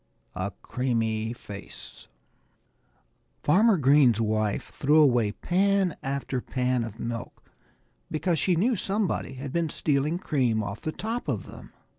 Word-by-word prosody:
X 95 0 -2
A - - -6
CREAMY 115 -3 -1
FACE 100 -4 -11 1.4
FARMER 200 +7 +5
GREEN'S 135 -5 +5
wife 110 -2 -1
threw 150 +2 +3
away 120 -8 +4
pan 190 - +1
after 135 -1 -2
pan 125 -1 0
of 115 0 -7
milk, 115 -1 -6 0.6
because 165 +1 0
she 180 +5 +2
knew 230 +9 +2
somebody 195 -7 -1
had 130 +1 -7
been 170 -2 0
stealing 150 +3 0
cream 125 - 0
off 100 +1 -6
the 155 - -2
top 225 +7 -4
of - - -1
them. - - -12
135 Hz, 135 wpm, -27 LUFS, 115-170 Hz, 1.4 s, FARMER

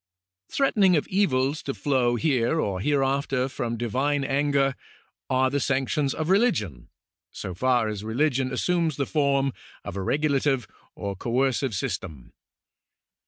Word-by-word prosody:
Threaten 270 -6 +1
ings 185 -3 +6
of 150 - -1
evils 145 -7 +1
to 135 - -4
flow 130 -4 +1
here 135 +1 +1
or 95 -9 -1
hereafter 135 +1 +1
from 120 -3 -3
divine 135 +5 0
anger 140 0 +1 0.6
are 130 0 +2
the 145 - 0
sanctions 135 +1 0
of 155 0 -2
religion, 145 - +1 0.4
so 95 - -6
far 125 +3 +2
as 105 -1 -4
religion 130 +3 0
assumes 165 +3 0
the 140 - -1
form 140 -3 +1 0.3
of - - -7
a 100 - -3
regulative 140 +1 +1 0.3
or 100 -1 -4
coercive 125 +2 0
system. 80 -8 -5
135 Hz, 135 wpm, -25 LUFS, 120-145 Hz, 0.6 s, ings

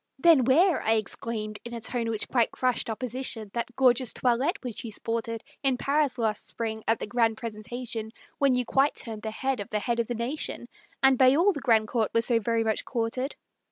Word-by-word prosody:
"Then 300 -4 +5
wear," 325 +7 +4
I 220 - +2
exclaimed, 215 0 -3
in 235 0 -6
a - - -4
tone 230 0 -1
which 220 -2 -1
quite 240 -3 +2
crushed 255 -2 -1
Opposition, 230 -2 -3
"that 235 0 -4
gorgeous 255 -2 +3
toilette 260 - +1
which 245 -4 -5
you 230 - -6
sported 230 +1 -3 0.2
In 270 -3 +2
Paris 280 0 +1
last 220 -3 -1
spring, 220 -1 -4
at 225 - +3
the - - -4
grand 225 0 +1
presentation, 225 0 -5 0.3
When 275 -3 +4
you 250 0 0
quite 275 +4 +2
turned 220 -2 -5
the 220 - -3
head 260 +3 -2
of 205 - -6
the 215 - -1
head 235 +2 -1
of 230 - 0
the 240 - -3
nation, 240 +1 -3 0.4
And 265 -1 +5
by 260 0 +6
all 370 +6 +4
the 285 - -6
grand 225 -4 +3
court 225 -1 0
were 230 - +4
so 235 -1 +2
very 230 +1 0
much 220 -1 0
courted." 250 +3 -2
235 Hz, 210 wpm, -27 LUFS, 225-260 Hz, 0.4 s, by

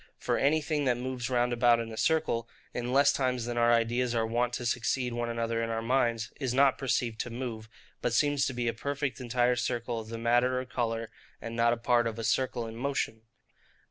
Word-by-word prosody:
For - - -1
anything 150 +1 +1
that 125 -2 +2
moves 125 0 -4
round 120 -1 +1
about 120 -1 +4
in 115 -1 -4
a - - -6
circle, 115 -5 +1 0.2
in 120 0 -3
less 140 +2 +5
times 125 -3 0
than 120 0 -3
our 120 0 +4
ideas 120 +1 +1
are 115 -1 +2
wont 120 +2 0
to 120 - -3
succeed 125 +1 0
one 120 0 -2
another 115 0 -1
in 115 - -2
our 115 0 -2
minds, 115 -2 +1
is 130 -3 -1
not 135 -1 +4
perceived 120 -4 -1
to - - -2
move; 115 -2 -5 0.3
but - - 0
seems 145 +3 +2
to 130 - -3
be 120 -1 -2
a 115 - +1
perfect 140 +1 -3
entire 125 0 +2
circle 120 -1 -2
of 110 - -8
the 115 - -5
matter 120 +2 +2
or 130 - -4
colour, 115 -2 -2 0.3
and 115 0 -6
not 120 0 +3
a 120 - 0
part 120 0 +2
of 115 -1 -4
a 115 - -4
circle 120 +1 0
in 115 0 -8
motion. 130 -3 -2
120 Hz, 220 wpm, -29 LUFS, 115-130 Hz, 0.3 s, less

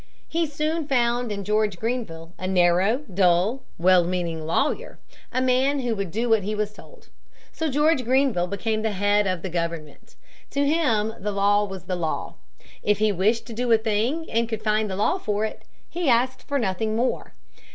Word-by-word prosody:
He 330 0 0
soon 305 +1 -2
found 240 -3 +1
in 200 -1 -4
George 210 -1 0
Grenville 175 -8 -4
a 185 - -3
narrow, 185 +7 +3
dull, 185 +7 +2 0.2
well 180 +1 +5
meaning 170 -3 -3
lawyer, 300 - -1 0.3
a 255 - 0
man 265 +2 +2
who 240 -3 -1
would 200 -3 -3
do 225 +7 -1
what 225 -2 +4
he 210 +3 -3
was 210 0 -2
told. - - -16 0.4
So 320 -1 -2
George 295 0 +2
Grenville 255 -7 +2
became 215 +3 -2
the 220 -1 -1
head 205 +1 +2
of 185 -2 -2
the 190 - -3
government. 170 -3 -5 0.3
To 280 0 0
him 235 -9 +1
the 210 +2 -2
law 205 +1 +3
was 190 -3 -8
the 185 - -3
law. 165 -3 -3 0.5
If 210 -1 +2
he 215 0 +2
wished 205 +5 +1
to 235 - -8
do 240 +1 -1
a 225 - +7
thing 225 +9 -1
and 230 0 +1
could 220 -1 -4
find 215 0 +1
the 190 - -3
law 215 - +1
for 210 - -1
it, 220 - -7 0.2
he 345 -4 -1
asked 250 +2 +1
for 285 - 0
nothing 215 -1 -1
more. 245 - -1
215 Hz, 190 wpm, -24 LUFS, 190-255 Hz, 0.5 s, a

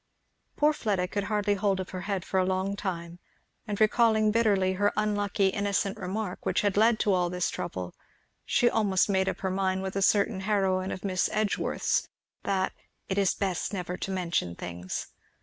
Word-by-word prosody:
Poor 300 +1 +3
Fleda 200 -9 -1
could 200 +1 -2
hardly 210 -1 +1
hold 200 -1 +1
up 185 - -5
her 185 - -5
head 195 -3 -1
for 190 - 0
a - - +3
long 190 +1 -1
time, 175 -4 -5 0.5
and 205 -1 -3
recalling 220 -1 +4
bitterly 205 -4 +2
her 205 +2 +2
unlucky 205 -2 +1
innocent 200 -1 0
remark 190 +1 -4
which - - +1
had 205 -2 +1
led 220 +2 +4
to 205 -2 +2
all 180 -1 +2
this 180 0 -1
trouble 90 -1 -5 0.5
she 240 - +2
almost 205 -4 +2
made 190 -1 +2
up - - -5
her 190 - -1
mind 190 0 0
with 190 0 -4
a 195 - 0
certain 200 -1 +3
heroine 190 -2 +1
of 185 - -6
Miss 185 -2 +1
Edgeworth's, 215 -1 0 0.3
that 190 -1 0 0.4
"it 195 +1 +1
is 195 -2 +2
best 190 -1 -2
never 180 -2 -3
to 195 - -5
mention 170 - -1
things." 90 +1 -5
195 Hz, 185 wpm, -28 LUFS, 185-205 Hz, 0.5 s, recalling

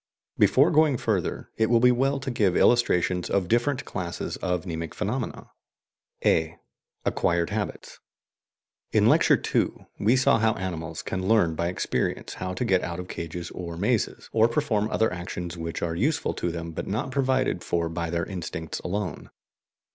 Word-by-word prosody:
Before 145 +7 +5
going 155 -4 +4
further, 105 -7 -2
it 110 - +3
will 120 -1 +5
be 125 +1 +6
well 135 +3 +1
to 130 0 -3
give 100 -6 +2
illustrations 90 -7 +3
of 95 -3 +1
different 125 +6 +1
classes 90 -3 -4
of 90 -1 -2
mnemic 80 -2 -5
phenomena. - - -3 0.7
(a) 80 +1 +2 0.5
ACQUIRED 85 +2 +1
HABITS. 105 -1 -4 0.9
In - - +4
Lecture - - +5
II - - 0
we 115 +5 +4
saw 135 -1 +4
how 110 0 +3
animals 85 -3 -4
can 95 0 -3
learn 105 -7 +4
by 85 +2 -1
experience 90 - -2
how 90 0 -4
to 125 - -1
get 95 -5 +3
out 85 0 -4
of 90 - -7
cages 85 +1 -5
or 85 -2 -6
mazes, 105 +4 0
or 115 0 +5
perform 115 -5 0
other 110 -4 +1
actions 90 -1 -5
which 85 -1 -4
are 85 -1 -1
useful 140 - 0
to 85 - -2
them 85 0 -5
but - - -5
not 110 +7 -2
provided 130 -7 +1
for 85 -1 0
by 85 0 -3
their 85 0 -1
instincts 80 -4 -5
alone. 95 -2 -4
95 Hz, 165 wpm, -26 LUFS, 85-120 Hz, 0.9 s, be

